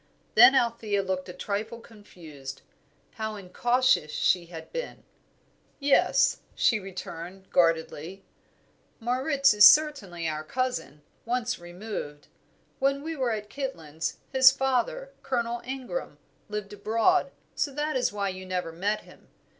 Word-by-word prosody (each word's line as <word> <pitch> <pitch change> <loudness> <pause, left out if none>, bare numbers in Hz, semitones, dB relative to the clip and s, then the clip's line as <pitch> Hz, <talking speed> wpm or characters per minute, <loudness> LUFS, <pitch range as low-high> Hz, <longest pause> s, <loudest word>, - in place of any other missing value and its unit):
Then 245 +4 +8
Althea 230 -5 +1
looked 185 -1 -3
a - - -6
trifle 215 +5 -4
confused. 160 - -11 0.5
How 220 -1 -4
incautious 240 -1 +1
she 175 +2 +1
had 160 -2 -10
been! - - -5 0.8
"Yes," 280 -1 +3 0.2
she 220 - +3
returned, 185 -1 -8
guardedly, 165 +2 0 0.8
"Moritz 265 +3 +2
is 210 0 +5
certainly 210 - +1
our 155 -1 -3
cousin 250 - -3 0.2
once 245 0 -2
removed. 175 -4 -7 0.5
When 275 +1 +1
we 325 +1 -4
were 260 -4 0
at 210 -2 -3
Kitlands, 165 - -4 0.2
his 260 0 +8
father, 275 - -1
Colonel 235 -2 -2
Ingram, 265 - -5 0.3
lived 210 -1 -5
abroad, 225 - +2 0.2
so 285 - -1
that 295 +2 -2
is 255 - +1
why 200 -1 -2
you 185 0 -7
never 180 -2 -3
met 200 +6 -1
him. - - -18
215 Hz, 125 wpm, -27 LUFS, 180-260 Hz, 0.8 s, Then